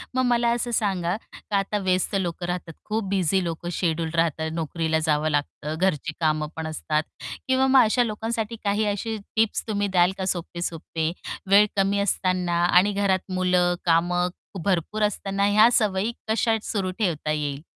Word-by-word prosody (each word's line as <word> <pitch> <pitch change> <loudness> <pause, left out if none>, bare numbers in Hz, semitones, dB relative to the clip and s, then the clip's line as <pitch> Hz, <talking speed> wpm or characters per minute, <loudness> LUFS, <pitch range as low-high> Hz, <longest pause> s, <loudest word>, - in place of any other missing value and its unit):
मग 255 - +2
मला 240 -1 +2
असं 240 0 -2
सांगा, 190 -4 0
का 205 -2 -5
आता 195 +2 -1
व्यस्त 185 0 0
लोक 175 -2 -2
राहतात, 175 -2 -4
खूप 220 0 -1
बिझी 190 -1 +1
लोक 170 0 -4
शेड्यूल 165 -2 -1
राहतात. 160 -1 +1
नोकरीला 160 0 -1
जावं 155 0 +1
लागतं, 150 +1 -2
घरची 165 -4 0
कामं 155 -1 +1
पण 160 0 -4
असतात 155 0 -1 0.4
किंवा 260 0 +3
मग 265 0 +6
अशा 240 +3 +3
लोकांसाठी 225 0 -3
काही 205 +1 +1
अशी 210 +2 -2 0.2
टिप्स 220 -1 +1
तुम्ही 205 -1 0
द्याल 180 -1 +3
का 190 - -2
सोपे-सोपे. 165 -2 -4 0.4
वेळ 205 +1 +7
कमी 200 0 +2
असताना 180 -3 +1
आणि 180 +3 +4
घरात 190 -2 0
मुलं 180 -1 +2
कामं 175 +2 +2 0.4
भरपूर 195 +3 0
असताना 200 -1 -1
ह्या 215 +3 +6
सवयी 210 0 +1 0.2
कशा 225 0 +2
सुरू 190 -3 -2
ठेवता 160 -6 0
येईल? 145 -2 -2
185 Hz, 160 wpm, -24 LUFS, 165-210 Hz, 0.4 s, वेळ